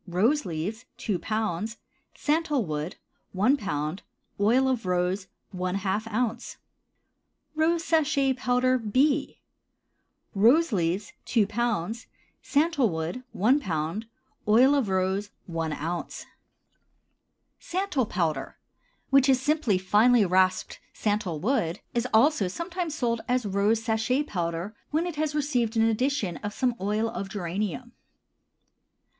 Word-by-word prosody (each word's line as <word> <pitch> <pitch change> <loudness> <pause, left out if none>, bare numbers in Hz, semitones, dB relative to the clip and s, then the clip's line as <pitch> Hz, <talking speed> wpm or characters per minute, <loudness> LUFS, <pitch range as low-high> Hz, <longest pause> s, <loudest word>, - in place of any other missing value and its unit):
Rose 220 - +1
leaves 185 +9 -4
2 205 -6 -2
lb. 215 0 -2 0.4
Santal 300 -5 0
wood 155 +1 -4 0.4
1 210 +9 +3
lb. 155 - -3 0.4
Oil 240 +6 +4
of 245 -7 -1
rose 180 +2 0 0.3
½ 190 +3 -1
oz. 230 +1 -2 1.0
ROSE 325 +2 +1
SACHET 290 -5 +2
POWDER, 250 0 +2
B. 275 +6 +1 0.9
Rose 255 +11 +4
leaves 180 +1 -1
2 225 -4 +2
lb. 225 -1 -2 0.3
Santal 290 -4 +2
wood 165 +8 -4
1 250 +9 +3
lb. 165 - -2 0.4
Oil 245 +6 +6
of 270 -8 +1
rose 190 +2 0 0.2
1 165 -2 -3
oz. 165 +3 -4 1.3
SANTAL 360 - -1
POWDER, 160 -9 -2 0.5
which 275 0 +5
is 260 -1 +5
simply 285 -7 +1
finely 210 +4 +4
rasped 185 0 +1
santal 205 -7 -1
wood, 185 - 0
is 240 +1 0
also 225 -2 +4
sometimes 335 - -4
sold 235 -5 0
as 250 -2 +1
rose 205 +3 +1
sachet 225 +5 +1
powder 175 - -3
when 315 +3 0
it 345 -4 -5
has 305 -1 -1
received 245 -6 0
an 225 - +4
addition 225 - 0
of 205 +7 -6
some 255 -2 +1
oil 210 +3 0
of 195 -3 -5
geranium. 205 +5 -3
220 Hz, 120 wpm, -27 LUFS, 185-265 Hz, 1.3 s, Oil